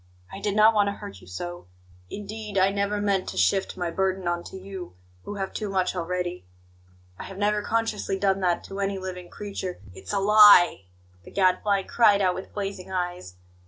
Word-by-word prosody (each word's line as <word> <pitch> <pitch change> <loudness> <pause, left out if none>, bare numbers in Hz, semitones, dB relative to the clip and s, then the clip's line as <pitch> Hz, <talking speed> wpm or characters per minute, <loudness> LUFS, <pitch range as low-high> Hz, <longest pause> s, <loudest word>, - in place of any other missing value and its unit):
"I 195 - -7
did 205 0 -1
not 215 +1 +6
want 205 -2 +3
to 200 - -1
hurt 200 -1 -10
you - - -16
so. 175 - -7 0.4
Indeed, 210 0 -6
I 190 +1 +4
never 200 +1 -1
meant 200 -2 0
to 95 - -7
shift 95 - +1
my 175 -2 -2
burden 190 0 -1
on 175 0 -1
to - - -8
you, 190 - -8 0.3
who 205 - -6
have 195 -1 -4
too 210 -2 -3
much 190 -1 0
already. 180 - -3 0.8
I - - -6
have 195 - -9
never 210 +1 +1
consciously 215 -3 -1
done 195 0 +1
that 180 -2 0
to 195 - -8
any 195 0 -1
living 185 -1 -7
creature 195 -3 -6
" 95 - -15
"It's 95 +1 -9
a 200 - +1
lie!" 205 - +7 0.4
the - - -13
Gadfly 195 +1 +2
cried 210 -3 +4
out 185 -2 +2
with 190 - -8
blazing 195 -2 -5
eyes. 180 - -4
195 Hz, 195 wpm, -25 LUFS, 180-205 Hz, 0.8 s, lie